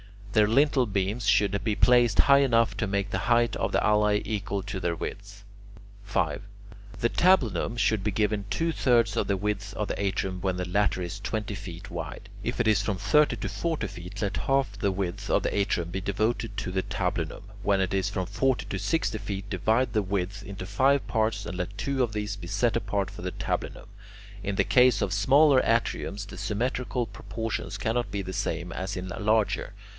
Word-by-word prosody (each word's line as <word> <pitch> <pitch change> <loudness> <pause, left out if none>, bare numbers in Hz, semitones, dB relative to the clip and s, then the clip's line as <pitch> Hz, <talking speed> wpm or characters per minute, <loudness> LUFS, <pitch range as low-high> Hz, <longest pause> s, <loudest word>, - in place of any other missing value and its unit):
Their 105 -1 +5
lintel 135 +3 +3
beams 100 +3 -1
should 100 -1 +3
be 105 -1 0
placed 120 -3 +4
high 140 0 +7
enough 115 -4 +3
to 110 - -1
make 100 0 -1
the - - 0
height 120 -1 +3
of - - -1
the - - +3
alae 105 -1 +3
equal 100 -2 -2
to 95 0 -4
their 85 -2 -1
width. 100 +3 -7 0.6
5. 100 +1 -1 0.6
The 120 - +3
tablinum 135 - +2
should 100 -1 +2
be 105 - +1
given 105 0 0
two 165 +8 0
thirds 120 -6 +2
of - - 0
the 100 - +1
width 105 0 -3
of 105 - -2
the - - -3
atrium 95 -1 -1
when 95 0 -1
the 90 0 -3
latter 100 0 +1
is 90 +3 -5
twenty 105 0 -3
feet 95 -5 -8
wide. - - -6
If - - -3
it - - 0
is 105 -3 +4
from 100 -2 -1
thirty 125 +11 +3
to - - -4
forty 165 -2 -2
feet, 90 +4 -8
let 100 -1 -1
half 135 -7 0
the 100 - +1
width 95 +2 -4
of - - +2
the - - -1
atrium 95 -4 0
be 95 - -3
devoted 110 +4 -1
to 95 - -4
the 95 0 0
tablinum. - - -3 0.2
When 100 -2 +2
it 95 0 -1
is 95 0 +1
from 95 -2 -2
forty 120 +3 0
to 100 -2 -3
sixty 160 - 0
feet, 100 -1 -5
divide 110 +7 +1
the 110 - +2
width 100 +1 -3
into 95 -1 -7
five 135 +8 +2
parts 110 -2 0
and 90 - -5
let 95 +2 -4
two 135 +3 -1
of 120 -3 0
these 105 0 -3
be 85 - -8
set 110 +5 +1
apart 100 -4 -2
for 105 +1 -10
the 90 - -3
tablinum. - - -4 0.5
In 100 - -2
the - - +3
case 125 -4 +4
of 95 - 0
smaller 135 +7 +5
atriums, 110 -3 0
the 95 - -10
symmetrical 120 +5 -1
proportions 105 -1 -5
cannot 110 +2 -1
be 100 0 -3
the 95 0 -6
same 85 0 -2
as 95 +3 -4
in 90 0 -5
larger. 105 -1 0
105 Hz, 200 wpm, -27 LUFS, 95-115 Hz, 0.6 s, high